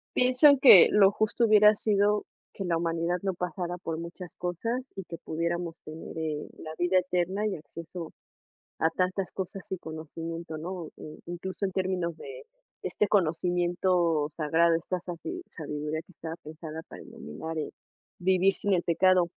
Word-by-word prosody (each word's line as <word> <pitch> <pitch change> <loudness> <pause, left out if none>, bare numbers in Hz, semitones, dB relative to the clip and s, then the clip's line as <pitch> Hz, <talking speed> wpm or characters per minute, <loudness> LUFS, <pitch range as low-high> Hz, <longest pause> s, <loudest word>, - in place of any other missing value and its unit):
Pienso 255 +3 +6
que 195 -9 +10
lo 200 -1 +6
justo 215 +3 +1
hubiera 210 -1 +7
sido 205 0 +2 0.3
que 195 - -5
la 170 -2 +1
humanidad 170 +1 0
no 190 - 0
pasara 180 0 -4
por 165 -3 -4
muchas 170 +1 -8
cosas, 230 +9 -3
y 195 - -5
que 170 - -7
pudiéramos 170 +1 -3
tener, 155 +1 -9
eh, 155 -2 -3
la 155 - -8
vida 180 +1 +3
eterna 185 +3 -1
y 200 - -2
acceso 165 +2 -8 0.7
a 160 - +3
tantas 185 +2 -1
cosas 190 0 -6
y - - -2
conocimiento, 165 0 -6
¿no? 175 +1 -5
Eh, 155 - -10
incluso 185 +3 -4
en 190 - -2
términos 185 -3 -1
de 455 - -10 0.4
este 210 - 0
conocimiento 175 -3 +2
sagrado, 165 +2 +3
esta 175 +2 -2
sabi 185 - -6
sabiduría 150 0 -4
que - - -20
estaba 160 0 -6
pensada 155 +1 -8
para - - -10
dominar, 160 - -7
eh, 155 - -3 0.5
vivir 190 +1 +3
sin 205 - -1
el 175 - +2
pecado. 180 +1 +4
175 Hz, 160 wpm, -28 LUFS, 165-190 Hz, 0.7 s, que